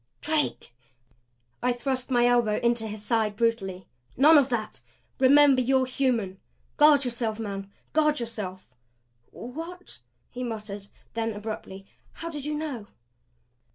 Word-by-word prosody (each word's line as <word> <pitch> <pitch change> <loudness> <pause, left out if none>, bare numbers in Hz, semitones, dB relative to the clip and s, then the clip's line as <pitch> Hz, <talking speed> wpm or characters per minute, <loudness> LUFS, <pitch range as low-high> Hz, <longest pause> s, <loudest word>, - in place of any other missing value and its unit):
"Drake!" 300 - -1 0.9
I 250 - +2
thrust 255 +1 -2
my 240 -2 +3
elbow 240 -3 +3
into 235 -1 +1
his 210 0 -6
side 220 -3 +1
brutally. 200 -5 -1 0.3
"None 300 +5 +7
of 280 -3 +5
that! 230 -4 -3 0.4
Remember 275 0 +6
you're 260 +1 +2
human! 240 -8 -1 0.4
Guard 295 -2 +6
yourself, 235 -3 -1
man 200 -2 -5 0.2
guard 300 -2 +3
yourself!" 200 - -6 0.6
"What?" 330 - -8 0.3
he 250 +1 -5
muttered; 210 -4 -5 0.3
then, 225 -1 -1
abruptly: 205 -2 -7 0.3
"How 335 0 -6
did 295 -3 -6
you 300 0 -2
know?" 285 -9 -4
240 Hz, 125 wpm, -27 LUFS, 215-275 Hz, 0.9 s, None